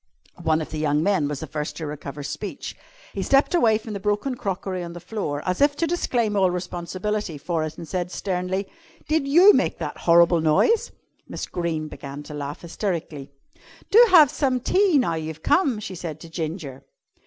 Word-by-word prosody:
One 160 0 +1
of 155 - -7
the 155 - -4
young 150 0 +1
men 190 -6 +2
was 145 -1 -4
the - - -4
first 150 0 -5
to 160 - -4
recover 145 -1 -6
speech. - - -6 0.4
He - - -3
stepped 275 +4 +3
away 230 -11 +4
from 220 0 -8
the 200 - -4
broken 210 +7 -1
crockery 190 -4 -3
on 170 0 -7
the 175 - -8
floor 175 -6 -4
as 185 +4 -1
if 285 0 +4
to 335 - 0
disclaim 245 -10 0
all 190 -2 +4
responsibility 180 +1 -3
for 160 +2 -2
it 155 0 -5
and 165 - -8
said 180 +1 -2
sternly: 185 +1 -2 0.4
"Did 310 -2 +1
you 355 +9 +7
make - - +1
that - - -5
horrible 170 0 +6
noise?" 160 - +3 0.4
Miss - - -4
Greene 165 -3 -3
began 140 -1 -8
to 150 - -10
laugh 145 0 -5
hysterically. 165 -5 -4 0.6
"Do 460 +4 +9
have 310 -7 +7
some 260 -3 0
tea 370 - +3
now 235 -11 +2
you've 160 -1 -5
come," 275 - +2
she 200 -2 -6
said 165 -3 -6
to 165 - -10
Ginger. 160 -5 -5
180 Hz, 190 wpm, -24 LUFS, 155-220 Hz, 0.6 s, Do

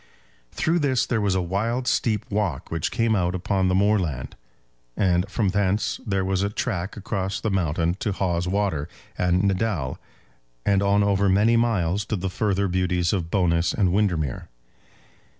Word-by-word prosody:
Through 170 +2 +1
this 135 -5 +1
there 115 -3 0
was 100 -2 +1
a 95 - +1
wild 115 +8 -1
steep 110 -4 +1
walk 100 -9 -2
which 80 -1 -1
came 115 -1 +1
out 90 -2 0
upon 95 +1 0
the 90 - +2
moorland, 95 - 0 0.6
and 90 0 +2
from 105 -1 0
thence 100 +1 0
there 95 -2 0
was 95 0 0
a 100 - 0
track 100 -3 -3
across 95 -1 -3
the 110 - -2
mountain 85 -2 0
to 105 - -1
Hawes 90 -2 -1
Water 90 -6 -1 0.3
and 90 +1 +1
Naddale, 95 -8 -1 0.7
and 100 -1 +3
on 100 +1 +3
over 100 -1 +2
many 105 +5 +4
miles 105 -5 +1
to 110 - -2
the 95 -1 -3
further 100 0 0
beauties 90 -1 0
of 85 -4 -2
Bowness 85 -2 +1
and 90 -4 +2
Windermere. 85 - 0
95 Hz, 165 wpm, -24 LUFS, 90-105 Hz, 0.7 s, many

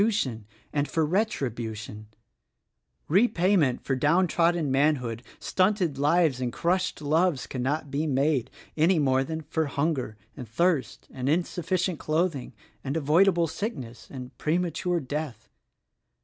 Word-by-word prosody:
^nT;~i 205 - +2 0.4
an 145 -1 +1
f - - -13
T,: - - +2
e - - +4
1 185 +8 +2
tribution 110 - -5 1.0
Repayment 180 - +3
for 135 - 0
downtrodden 165 +1 +2
manhood, 135 -5 +1 0.2
stunted 185 -7 +1
lives 150 -2 +3
and 125 -1 -1
crushed 180 +2 -1
loves 155 -2 +2
cannot 135 +3 -2
be 150 +3 -1
made 135 -2 +1 0.3
any 165 +4 +3
more 135 -3 +2
than 160 +3 -4
for 160 +1 -2
hunger 140 -6 -1 0.2
and 125 -6 -8
thirst 160 +4 0
and 130 +1 -3
insufficient 175 +1 0
cloth 165 +3 +1
ing 135 -3 -7 0.3
and 140 +3 -2
avoidable 170 +4 +4
sickness 160 - -5
and 125 -2 -9
premature 175 +2 0
death. 145 -1 -5
155 Hz, 135 wpm, -27 LUFS, 135-175 Hz, 1.0 s, e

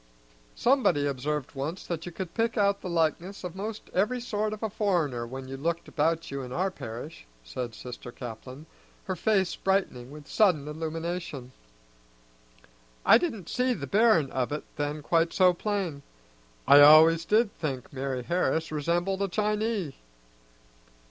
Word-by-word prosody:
"Somebody 245 - +3
observed 145 +1 -2
once 150 +6 -4
that 170 0 -4
you - - -5
could 175 0 -6
pick 230 +1 0
out 200 -1 +2
the 185 - -5
likeness 170 +4 -1
of 180 -1 -6
'most 215 +2 -6
every 215 +7 +1
sort 215 -3 -2
of 215 +1 -6
a 220 - 0
foreigner 165 - 0
when 130 +2 -7
you 135 +1 -6
looked 170 +4 -2
about 165 +1 0
you 140 0 -3
in 125 -1 -8
our 185 +7 0
parish," 115 - -8 0.2
said 120 - -5
Sister 125 0 -8
Caplin, 125 +4 -9 0.4
her 185 - -3
face 190 -1 +1
brightening 190 -11 -1
with 145 0 -11
sudden 175 -9 +2
illumination. 160 -3 -5 1.5
"I - - +8
didn't 220 - -3
see 250 0 0
the - - -5
bearin' 205 - +3
of 130 +1 -1
it 150 - -3
then 145 +1 -3
quite 165 +1 +2
so 185 -1 +5
plain. 185 -6 -3 0.7
I 140 +2 +9
always 160 +3 +8
did 215 +3 +2
think 135 -6 -4
Mari' 130 -2 -3
Harris 165 0 0
resembled 175 +6 -1
a 200 - +1
Chinee." 210 -4 -1
165 Hz, 155 wpm, -28 LUFS, 140-195 Hz, 1.5 s, I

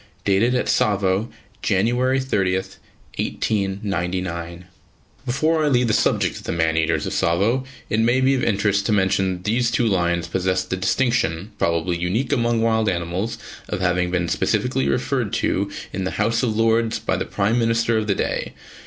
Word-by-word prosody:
Dated 105 +6 +3
at 125 - +1
Tsavo, 100 +1 +1 0.3
January 120 +7 +1
30, 100 -8 0 0.6
1899. 90 -4 -2 0.6
Before 155 +5 +1
I - - +2
leave 125 -3 +3
the 110 - +1
subject - - +1
of - - -10
"the - - -2
man 80 -1 +1
eaters 80 -1 +1
of - - -3
Tsavo," 105 +10 +1 0.2
it 105 - 0
may 120 +3 +3
be 130 +1 +3
of 130 - 0
interest 100 -2 +1
to - - +1
mention 95 -2 +2
that 90 0 -9
these 120 +4 +1
two 115 +1 +1
lions 85 -5 +1
possess 95 +1 0
the 95 - -3
distinction, 100 -4 0
probably 85 +1 0
unique 105 +9 0
among 120 -3 +1
wild 110 -2 +2
animals, 90 +5 -2 0.3
of - - -2
having 90 -1 +1
been 90 -1 0
specifically 70 -4 0
referred 70 - -1
to 100 +2 0 0.2
in 95 - -2
the 95 - -1
House 115 0 +1
of 110 -4 -1
Lords 115 0 +2
by - - -1
the - - -1
Prime 105 +4 0
Minister 115 0 +1
of 110 - -3
the 100 - +1
day. - - -2
100 Hz, 170 wpm, -22 LUFS, 90-115 Hz, 0.6 s, Dated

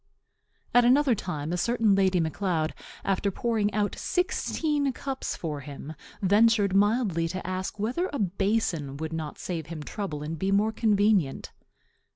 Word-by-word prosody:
'" - - -41
At 245 - +6
another 260 +2 +5
time 165 -6 -3
a - - 0
certain 225 +1 +2
Lady 190 -2 +3
Macleod, 160 0 -1 0.3
after 195 +1 +1
pouring 215 0 0
out 205 -1 0
sixteen 305 -5 0
cups 270 0 -4
for 150 -4 -4
him, 140 +2 -8 0.3
ventured 205 0 +4
mildly 205 -5 +2
to 185 +3 -5
ask 185 +2 -3
whether 245 - -1
a 285 - -3
basin 190 - 0
would 160 +2 -4
not 160 -2 -4
save 165 -4 -4
him 155 -2 -6
trouble 150 -3 -5
and 155 +1 -5
be 190 +2 0
more 210 +2 +3
convenient. 205 - +2
195 Hz, 155 wpm, -27 LUFS, 165-225 Hz, 0.3 s, At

